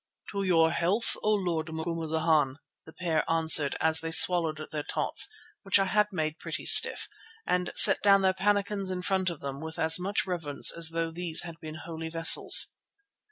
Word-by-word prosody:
"To 200 - -5
your 165 -4 +1
health, 195 +7 -2
O 215 - -1
Lord 175 -6 -3
Macumazana," 160 -3 -3 0.3
the 160 - -15
pair 170 -3 -3
answered 160 -3 0
as 160 0 +1
they 165 - -6
swallowed 160 -2 +3
their 150 - -5
tots, - - -2 0.3
which 195 -1 +2
I 195 - -1
had 210 +2 0
made 155 -3 -5
pretty - - -8
stiff, - - +6 0.4
and 180 0 -3
set - - +6
down 195 -1 +2
their 190 0 +1
pannikins 200 0 -3
in 180 -1 -6
front 190 -1 -2
of 170 -4 -10
them 140 0 -8
with 160 +1 -10
as 160 +1 +2
much 195 +2 -3
reverence 165 -6 +1
as 165 -1 +3
though 165 0 -4
these 170 -1 -5
had 170 -1 -12
been 155 -1 -11
holy 160 -1 -8
vessels. 165 0 +5
165 Hz, 180 wpm, -26 LUFS, 160-185 Hz, 0.4 s, stiff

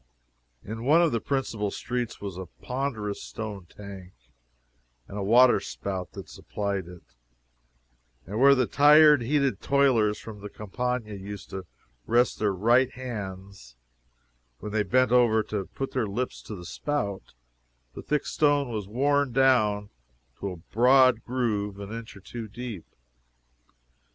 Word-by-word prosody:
In 110 +2 -6
one 155 +6 +5
of 165 - +2
the 115 -2 -1
principal 115 -7 -2
streets 120 +2 -4
was 100 -3 -6
a 95 0 -7 0.2
ponderous 125 -6 -3
stone 105 -5 -7
tank, 95 -1 -11 0.9
and - - -10
a 105 - -3
water 120 +5 +6
spout 95 -2 -5
that - - -9
supplied 100 -3 -4
it, 90 -1 -12 1.2
and 105 +3 -4
where 140 +1 +7
the 130 -2 +2
tired, 150 +1 +6
heated 135 -3 0
toilers 125 -7 +3
from 110 -2 -10
the 105 - -7
Campagna 115 +2 -3
used 100 0 -8
to 95 -2 -6 0.4
rest 120 0 +2
their 105 -1 +2
right 120 +7 +3
hands 100 - -8 0.8
when 105 - -7
they 110 0 +1
bent 125 +5 +2
over 120 -3 +4
to 100 -2 -4
put 135 - -3
their 125 -5 -1
lips 120 +6 -3
to 105 - -8
the 90 -2 -10
spout, 100 - -4 0.6
the - - -8
thick 150 -1 -1
stone 145 -3 +2
was 105 -4 -4
worn 140 +4 +1
down 110 -6 +2 0.5
to 100 - -3
a 90 - -7
broad 125 +6 +4
groove 105 -5 -2
an 100 +1 -7
inch 115 -2 -8
or - - -14
two 115 +3 -7
deep. 115 -4 -7
110 Hz, 145 wpm, -27 LUFS, 100-130 Hz, 1.2 s, where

